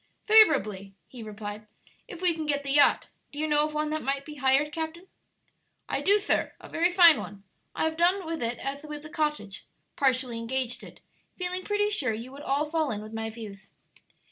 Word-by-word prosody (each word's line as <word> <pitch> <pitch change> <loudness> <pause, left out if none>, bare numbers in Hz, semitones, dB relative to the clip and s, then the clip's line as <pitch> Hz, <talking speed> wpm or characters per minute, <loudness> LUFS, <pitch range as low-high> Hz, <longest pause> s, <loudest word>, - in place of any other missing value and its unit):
"Favorably," 215 - +4
he 250 - -11
replied, 210 0 -7 0.4
"if 350 +1 -9
we 355 -2 +4
can 315 -1 -5
get 285 -1 0
the 275 - -3
yacht. 290 +1 +4 0.2
Do 290 - -12
you 310 - 0
know 300 0 +3
of 305 - -9
one 305 0 -1
that 310 0 -2
might 275 +2 -2
be 300 -1 -9
hired, 275 +2 +2
captain?" 320 +3 -5 0.8
"I - - -2
do, 405 +2 +4
sir; 420 0 0
a - - -12
very 340 +2 +1
fine 345 -4 +7
one. 200 -1 -9 0.3
I - - -1
have 320 0 -1
done 360 +2 +2
with 325 0 -4
it 235 0 -1
as 275 +1 -4
with 300 -1 -7
the 305 - -10
cottage 300 - -3 0.3
partially 255 -3 +1
engaged 245 +1 -3
it - - -13 0.4
feeling 365 0 -2
pretty 415 +1 0
sure 260 - 0
you 230 +4 -7
would 280 +1 -10
all 285 +1 0
fall 310 -1 -1
in 210 -1 -3
with 215 +1 -10
my 225 0 -3
views." 215 -3 -10
290 Hz, 205 wpm, -27 LUFS, 235-325 Hz, 0.8 s, fine